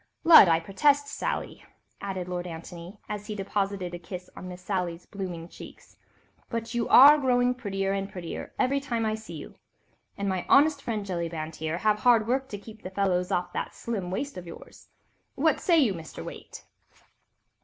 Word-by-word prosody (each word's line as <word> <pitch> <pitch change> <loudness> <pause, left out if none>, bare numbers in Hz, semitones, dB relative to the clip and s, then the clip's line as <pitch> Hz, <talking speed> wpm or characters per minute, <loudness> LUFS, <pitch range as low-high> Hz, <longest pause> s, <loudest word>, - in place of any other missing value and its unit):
"Lud, 325 - +10
I 165 -1 +4
protest, 285 - +2
Sally," - - -4 0.4
added 190 -2 -4
Lord 180 0 -4
Antony, 170 +3 -9
as 210 -1 -5
he 210 - -4
deposited 195 -2 -2
a 175 - -5
kiss 180 +1 -9
on 185 - -8
Miss 180 0 -9
Sally's 180 -3 -3
blooming 180 -4 -6
cheeks, - - -13 0.5
"but 230 0 -4
you 240 -1 -1
are 290 +3 +9
growing 250 -2 +2
prettier 195 -5 -2
and 195 0 -2
prettier 175 -3 -6
every 275 +2 +2
time 235 -5 -2
I 215 - 0
see 215 -6 -7
you—and 200 +5 -10
my 185 -2 -1
honest 290 0 +5
friend, 220 -6 -3
Jellyband 165 -4 -4
here, 160 0 -3
must 175 - -7
have 210 -1 +3
hard 230 -3 +4
work 265 +2 0
to 205 - -5
keep 215 +2 -13
the 185 - -6
fellows 185 -1 0
off 180 -1 -1
that - - -4
slim 205 -6 -4
waist 275 +9 -4
of 180 -1 -8
yours. 165 - -12 0.5
What 310 +3 +2
say 340 -2 +3
you, 255 -10 +4
Mr. 165 -3 -8
Waite?" - - -10
195 Hz, 180 wpm, -27 LUFS, 180-235 Hz, 0.5 s, Lud